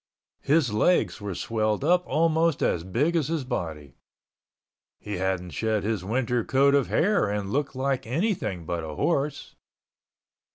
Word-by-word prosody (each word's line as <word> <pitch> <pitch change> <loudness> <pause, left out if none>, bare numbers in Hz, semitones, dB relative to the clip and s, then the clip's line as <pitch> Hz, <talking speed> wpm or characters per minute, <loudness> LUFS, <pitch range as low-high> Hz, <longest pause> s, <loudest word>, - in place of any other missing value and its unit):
His 140 -6 +2
legs 105 - +2
were 100 -3 -4
swelled 110 +3 -1
up 180 +4 +3
almost 160 +1 +2
as 85 - +1
big 130 - 0
as 155 -5 +1
his 160 -3 -1
body. 80 - -5 1.0
He 105 -2 -6
hadn't 95 -1 -2
shed 110 -2 -1
his 105 -3 -1
winter 120 +3 0
coat 140 +3 +3
of 140 -2 +3
hair 200 - +2
and 100 -1 -3
looked 140 +1 -1
like 135 -1 -1
anything 135 - -1
but 85 0 -3
a 80 -1 -6
horse. 145 - -1
120 Hz, 150 wpm, -26 LUFS, 95-150 Hz, 1.0 s, up